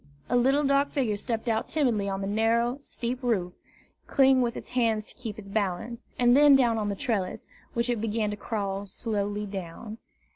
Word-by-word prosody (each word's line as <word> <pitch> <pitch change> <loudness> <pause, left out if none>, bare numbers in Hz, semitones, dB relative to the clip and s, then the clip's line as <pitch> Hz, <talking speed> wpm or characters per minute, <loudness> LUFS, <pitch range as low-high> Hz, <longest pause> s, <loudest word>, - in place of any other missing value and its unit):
A - - +3
little 270 +4 +3
dark 280 0 +2
figure 245 -7 +1
stepped 225 +2 -3
out 225 -1 0
timidly 235 -10 +1
on 195 0 -3
the 195 - -2
narrow, 230 +5 +1
steep 250 -2 -4
roof, 195 -8 0 0.5
clinging 265 -1 +4
with 240 -1 -1
its - - -9
hands 225 -4 +1
to - - -11
keep 225 -4 -7
its 205 -2 -10
balance, 210 +3 -2
and 245 0 +5
then 290 0 +7
down 240 -4 +3
upon 210 -1 -1
the 200 - -2
trellis, 195 -4 -2 0.3
which 235 +1 +1
it 240 -3 -1
began 215 -1 -1
to - - -3
crawl 200 -2 -3
slowly 205 0 -2
down. 200 +3 -7
225 Hz, 190 wpm, -27 LUFS, 205-245 Hz, 0.5 s, then